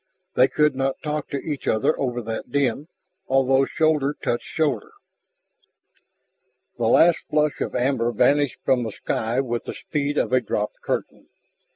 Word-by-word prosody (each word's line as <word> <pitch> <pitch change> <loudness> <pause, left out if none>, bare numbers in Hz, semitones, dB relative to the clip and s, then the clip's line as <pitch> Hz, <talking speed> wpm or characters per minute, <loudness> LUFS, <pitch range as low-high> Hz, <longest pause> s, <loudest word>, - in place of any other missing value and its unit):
They 130 - +5
could 150 +1 +2
not 135 0 -1
talk 150 -1 -3
to 140 - -2
each 145 0 -5
other 110 +7 +2
over 125 -3 -2
that 115 +2 -5
din, 140 +1 0 0.4
although 135 0 +3
shoulder 150 -3 +1
touched 120 - -2
shoulder. 145 -9 -1 1.9
The 115 - +1
last 165 +8 +5
flush 150 -1 +1
of - - -3
amber 125 -2 +1
vanished 140 +4 +2
from 130 -2 +3
the 115 -2 -3
sky 115 +5 -1
with 120 -3 -3
the - - -6
speed 145 -1 -2
of - - 0
a 130 - +4
dropped 105 -2 -3
curtain. - - -4
135 Hz, 155 wpm, -23 LUFS, 120-145 Hz, 1.9 s, They